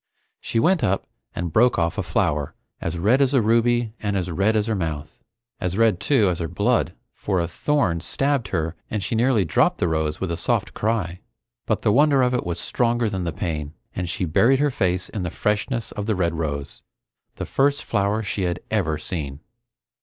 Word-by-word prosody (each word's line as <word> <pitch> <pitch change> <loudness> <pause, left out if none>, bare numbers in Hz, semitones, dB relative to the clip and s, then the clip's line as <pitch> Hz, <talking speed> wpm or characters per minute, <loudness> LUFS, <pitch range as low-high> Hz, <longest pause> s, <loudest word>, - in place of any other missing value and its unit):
She 115 - -1
went 175 +6 +3
up 95 +1 +1 0.3
and 85 -2 -3
broke 120 +3 +4
off 85 0 +1
a - - +2
flower 75 -1 -1 0.2
as 85 +1 -3
red 110 +10 +3
as 135 0 +3
a 130 - +5
ruby 115 0 +2
and 100 -2 -1
as 90 -1 -2
red 100 +6 +2
as 105 -1 +2
her 115 - -1
mouth. 80 -6 -4 0.4
As 90 0 -2
red, 110 -5 +3
too, 110 +1 +3
as 90 -1 0
her 85 - -2
blood, 85 +1 +1 0.2
for 95 -3 -1
a 85 - 0
thorn 90 - 0
stabbed 135 - 0
her 80 -1 -2
and 105 -3 -2
she - - -3
nearly 115 -3 +3
dropped 80 - +2
the - - +1
rose 80 -1 -1
with 95 -3 -2
a 85 - -2
soft - - 0
cry. 100 -5 -1 0.5
But 110 - 0
the 105 - +4
wonder 140 0 +5
of 125 0 +2
it 125 - -1
was 85 0 -2
stronger 120 -2 0
than 95 -2 -2
the 85 - -1
pain, 75 -2 -4 0.2
and 90 -2 -3
she 90 - -1
buried 115 +11 +4
her 145 +1 +2
face 90 -5 0
in 105 - -5
the 90 - -2
freshness 105 - -1
of 105 -1 -5
the 110 - +1
red 85 -3 0
rose, 75 -3 -3 0.5
the - - -4
first 140 +2 +1
flower 100 +2 0
she 100 -1 -3
had 90 -1 -1
ever 85 -8 +1
seen. 75 -5 -5
100 Hz, 205 wpm, -23 LUFS, 85-115 Hz, 0.5 s, a